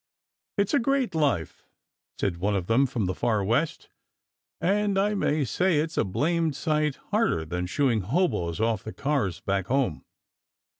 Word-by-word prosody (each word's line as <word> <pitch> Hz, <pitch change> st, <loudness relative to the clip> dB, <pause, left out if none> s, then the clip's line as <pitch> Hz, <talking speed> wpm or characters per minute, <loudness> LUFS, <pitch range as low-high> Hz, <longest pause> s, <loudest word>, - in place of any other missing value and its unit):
"It's 200 Hz, +4 st, +1 dB
a 285 Hz, -, +5 dB
great 265 Hz, -4 st, +1 dB
life," 145 Hz, -, -1 dB, 0.5 s
said 90 Hz, -4 st, -1 dB
one 100 Hz, +4 st, 0 dB
of 95 Hz, -3 st, -1 dB
them 125 Hz, +7 st, +3 dB
from 120 Hz, -6 st, -2 dB
the 90 Hz, -, -1 dB
Far 110 Hz, +1 st, 0 dB
West, 120 Hz, +11 st, 0 dB, 0.7 s
"and 200 Hz, +2 st, +1 dB
I 205 Hz, +2 st, +2 dB
may 155 Hz, -7 st, +1 dB
say 175 Hz, +6 st, +1 dB
it's 160 Hz, +2 st, -1 dB
a -, -, +2 dB
blamed 160 Hz, -, 0 dB
sight 150 Hz, -2 st, 0 dB, 0.2 s
harder 80 Hz, -1 st, +1 dB
than 90 Hz, +3 st, -3 dB
shooing 120 Hz, +1 st, +1 dB
hoboes 105 Hz, -, 0 dB
off 110 Hz, -2 st, +1 dB
the 110 Hz, -, -7 dB
cars 135 Hz, -, -1 dB
back 95 Hz, -1 st, -1 dB
home. 130 Hz, -, 0 dB
135 Hz, 160 wpm, -26 LUFS, 100-165 Hz, 0.7 s, a